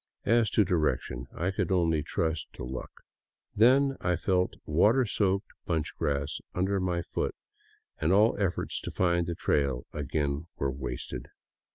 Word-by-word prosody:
As 115 0 +4
to 105 - +3
direction, 70 -7 0
I 90 +4 -1
could 95 - -1
only 85 -4 +2
trust 80 +1 -1
to - - -8
luck. 65 +1 -5 0.7
Then 135 +5 +5
I 90 -1 +1
felt 90 +1 +1
water 105 - +4
soaked 100 -1 0 0.2
bunch 80 -4 -1
grass 70 -1 -1 0.2
under 95 +2 +1 0.2
foot, - - -2 0.6
and 80 +3 +1
all 105 +4 +5
efforts 95 -4 -1
to - - -5
find 85 -2 +1
the 85 - -2
trail 70 -6 0
again 75 +1 -2
were 70 -1 0
wasted. 65 -2 -5
85 Hz, 145 wpm, -29 LUFS, 75-100 Hz, 0.7 s, Then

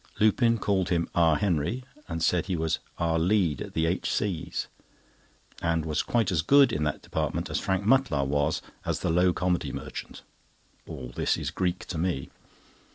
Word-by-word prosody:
Lupin 115 +2 +4
called 95 -4 0
him 85 -1 +1
"our 80 -2 +4
Henry," 100 - 0 0.3
and 80 -1 -2
said 90 +1 +2
he 95 - 0
was 80 -1 0 0.2
"our 80 0 +1
lead 90 -3 +2
at - - -7
the 80 - +2
H.C.'s," 90 +1 -1 1.0
and 80 -1 0
was 75 -1 0
quite 115 -6 +1
as 85 -4 +2
good 140 - +5
in 75 - 0
that 75 - -2
department - - -2
as - - -1
Harry 95 0 +1
Mutlar 105 - +3
was 70 +2 0 0.2
as - - -2
the - - 0
low 90 +2 +4
comedy 90 0 0
merchant. - - -7 0.6
All 60 -2 -7
this - - +1
is - - -3
Greek 90 -1 -1
to 85 - -4
me. 85 -6 -2
85 Hz, 170 wpm, -27 LUFS, 80-95 Hz, 1.0 s, good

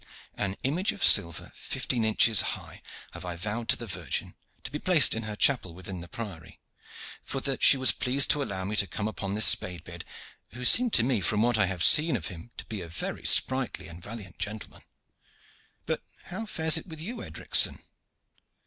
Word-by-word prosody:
An 100 -1 -3
image 170 +9 0
of 200 - -6
silver 85 -2 +3
fifteen 120 -3 -3
inches 110 -1 +4
high - - -6 0.3
I - - -8
have 85 -2 -7
vowed 110 +3 -4
to - - +4
the - - -8
Virgin, - - -4 0.3
to - - -7
be 150 - -5
placed 170 -7 +3
in 115 - -4
her 110 -1 -6
chapel 105 -8 +1
within 95 0 -7
the 85 - -10
Priory, 105 - -9 0.6
for 135 - -5
that 135 -1 -3
she 140 - +7
was 130 0 +4
pleased 130 +2 +2
to 150 - +2
allow 95 -8 -4
me 105 +2 -3
to 100 - +2
come 105 +2 -4
upon 100 -1 -5
this 110 - +6
Spade 90 -3 +3
beard, 85 -1 -9 0.5
who 125 0 -6
seemed 245 - +5
to 115 - +4
me 120 -4 0
from 105 +4 +1
what 120 -2 +1
I 105 - +3
have 90 -2 -3
seen 155 +2 +6
of - - -6
him 90 +5 -11
to - - -8
be 110 -4 -7
a 85 - -8
very 80 - -6
sprightly 130 -9 +2
and 85 +2 -12
valiant 105 -2 -10
gentleman. 105 +1 -6 1.0
But - - -3 0.2
how 215 +5 -7
fares 160 -4 +2
it - - -14
with 160 -3 -10
you, 230 +9 -7
Edricson?" - - +1
110 Hz, 200 wpm, -27 LUFS, 95-135 Hz, 1.0 s, she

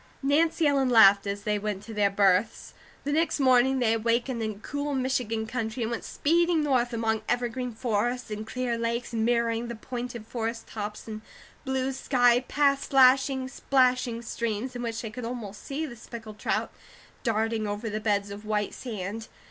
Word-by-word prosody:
Nancy 315 +4 +2
Ellen 275 -3 +3
laughed, 200 -4 +7
as 200 0 -3
they 210 -1 0
went 205 -1 -3
to 225 - -9
their 205 -1 +3
berths. 195 +2 +1 0.3
The 285 - -2
next 320 0 +1
morning 260 0 +4
they 235 -3 +2
awakened 235 +2 0
in 215 -2 -3
cool 285 +2 -3
Michigan 250 -4 -1
country 230 0 -3
and 225 - -2
went 235 - -3
speeding 335 +1 +2
north 255 -4 +1
among 225 -1 0
evergreen 245 0 -1
forests 240 +1 -1
and 215 +1 -5
clear 240 0 -2
lakes 235 +1 -2
mirroring 230 0 +1
the 235 - -5
pointed 240 0 -6
forest 225 0 -4
tops 210 0 -6
and 215 -1 -6 0.4
blue 265 0 0
sky, 245 -2 +3
past 280 -1 +2
slashing, 265 0 +4
splashing 255 -3 +1
streams, 235 +1 -3
in 245 - -4
which 230 -1 -3
they 220 - -5
could 245 +3 -7
almost 230 -4 -6
see 290 +3 -3
the 255 -6 -8
speckled 225 -2 -10
trout - - -1 0.5
darting 225 -1 0
over 205 +2 -3
the 215 0 -2
beds 205 -2 0
of 205 +1 -8
white 210 -1 -1
sand. 220 -2 -5
235 Hz, 170 wpm, -27 LUFS, 220-255 Hz, 0.5 s, laughed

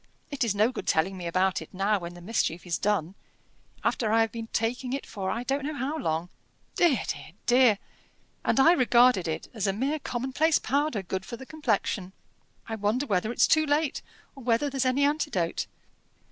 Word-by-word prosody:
It 275 -2 -1
is 220 -4 0
no 215 +4 +3
good - - -7
telling 175 +5 +2
me 180 -2 -5
about 185 +2 +1
it - - -11
now, 200 +2 +1
when 175 0 -7
the 175 - -11
mischief 180 -3 -1
is 175 -2 -1
done, 195 -4 0 0.7
after 220 -3 0
I 225 +1 +4
have 225 -1 +1
been 225 -1 -6
taking 245 +3 -2
it 275 - -3
for 195 -3 -4
I 235 - -2
don't 275 +2 -1
know 300 +2 -3
how 280 +2 -2
long. 165 - -2 0.4
Dear! 315 - +3
dear! 160 - -5
dear! 245 -4 +5 0.6
and - - +2
I 320 +5 +7
regarded 245 - +4
it 160 - -3
as 215 -4 -1
a 195 - +1
mere 275 +9 -1
commonplace 270 +5 +1
powder, 280 -7 0
good 190 +1 -3
for 235 - -7
the 265 - -10
complexion. 215 -10 -1 0.5
I 225 - -5
wonder 215 +7 0
whether 210 -1 0
it's - - +4
too 310 -1 +3
late, 295 0 +1 0.3
or 270 - -11
whether 245 +4 +1
there's 270 -1 0
any 260 +2 +2
antidote?" 285 - -1
230 Hz, 195 wpm, -27 LUFS, 195-270 Hz, 0.7 s, I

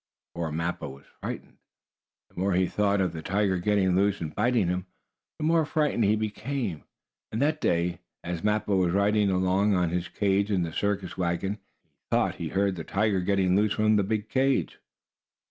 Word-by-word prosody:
Poor 85 -2 -3
Mappo 85 +3 -3
was 70 +1 -13 0.2
frightened. - - -6 0.7
The - - -10
more 95 +1 +1
he 95 0 +3
thought 100 +1 +1
of 90 -3 0
the 80 - -5
tiger 95 +1 0
getting 95 -1 +2
loose 100 +1 +2
and 80 -3 -5
biting 115 -3 +2
him, 90 +1 -2 0.5
the - - -5
more 165 0 +4
frightened 150 -6 +1
he 105 +2 +4
became. 110 - -3 0.5
And 110 - -2
that 150 +3 +1
day, 85 +1 +1 0.2
as 85 -1 -4
Mappo 105 -1 +1
was 90 -2 +2
riding 100 +1 +3
along 95 +2 +2
in 90 -2 +2
his 90 0 -1
own - - -22
cage 100 0 +2
in 95 -4 +1
the 80 -1 -4
circus 100 -2 -2
wagon, 90 +4 -1 0.2
he - - -46
thought - - +1
he - - -4
heard 100 -1 0
the 80 - -4
tiger 100 +1 +1
getting 95 -1 +2
loose 105 +1 +3
from 110 0 +3
the 105 - +4
big 105 +1 -2
cage. 135 0 +1
100 Hz, 190 wpm, -27 LUFS, 90-105 Hz, 0.7 s, more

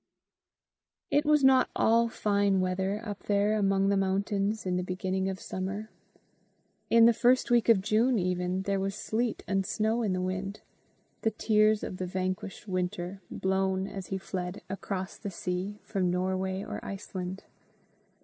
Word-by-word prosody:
It 295 +1 +3
was 300 -1 +4
not 265 -1 +5
all 230 +1 +3
fine 200 -3 +1
weather 190 +2 0
up 205 -2 -5
there 205 +1 +2
among 195 -1 +2
the 200 - +3
mountains 200 +2 0
in 180 -1 0
the 180 - 0
beginning 185 +1 -2
of 190 -1 -4
summer. 200 +4 -5 1.0
In 230 0 +7
the 235 - +7
first 245 +2 +3
week 240 -1 +4
of 215 -5 +6
June 230 +4 +3
even, 180 0 -1
there 195 0 0
was 195 0 -2
sleet 225 +2 -2
and 195 -1 +1
snow 220 +4 0
in 205 -5 0
the 185 - -1
wind 185 +2 -3 0.6
the 225 - +2
tears 215 -1 +2
of 185 - -5
the 185 - -3
vanquished 185 +2 -4
Winter, 185 0 -3
blown, 190 0 0
as 195 -2 -6
he 195 - -2
fled, 185 0 -5
across 195 -1 -4
the 205 - -5
sea, 185 +2 -3
from 190 -4 0
Norway 190 +1 -1
or - - -6
Iceland. 190 -1 -6
195 Hz, 160 wpm, -29 LUFS, 185-215 Hz, 1.0 s, In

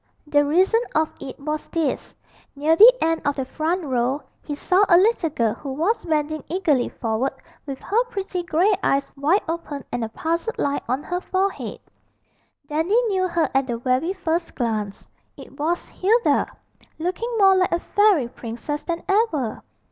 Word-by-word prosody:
The 290 -1 +3
reason 370 +10 +3
of 315 0 +2
it 265 - -8
was 300 +2 -4
this: 320 -5 -2 0.4
near 305 +3 +2
the 445 +8 +10
end 325 0 +1
of 285 -1 0
the 270 - -2
front 330 +6 -2
row 260 0 0 0.2
he 295 - -5
saw 370 +6 +2
a 345 - +7
little 385 -3 +3
girl 230 -7 0
who 270 +3 -7
was 385 - 0
bending 310 -1 -1
eagerly 315 -8 +1
forward 230 +4 -2 0.3
with 275 -1 -4
her 455 +4 +1
pretty 390 -5 -4
grey 350 +4 +2
eyes 275 0 0
wide 300 +8 +2
open 320 -4 -4
and 245 - -2
a 220 - -3
puzzled 335 - -2
line 285 0 0
on 260 +4 -1
her 355 0 -3
forehead. 380 +1 -2 0.9
Dandy 325 +9 +2
knew 375 -2 +1
her 340 -2 +1
at 270 0 +2
the 240 -2 -2
very 255 +9 0
first 335 -2 -2
glance. 215 -5 -3 0.3
It - - -13
was 335 +4 -1
Hilda, 450 +6 +2 0.5
looking 370 +9 -3
more 390 -2 +6
like 370 -1 +2
a 340 - +1
fairy 405 - +3
princess 240 +6 -5
than 340 -1 -3
ever. 390 - +1
320 Hz, 170 wpm, -23 LUFS, 275-370 Hz, 0.9 s, the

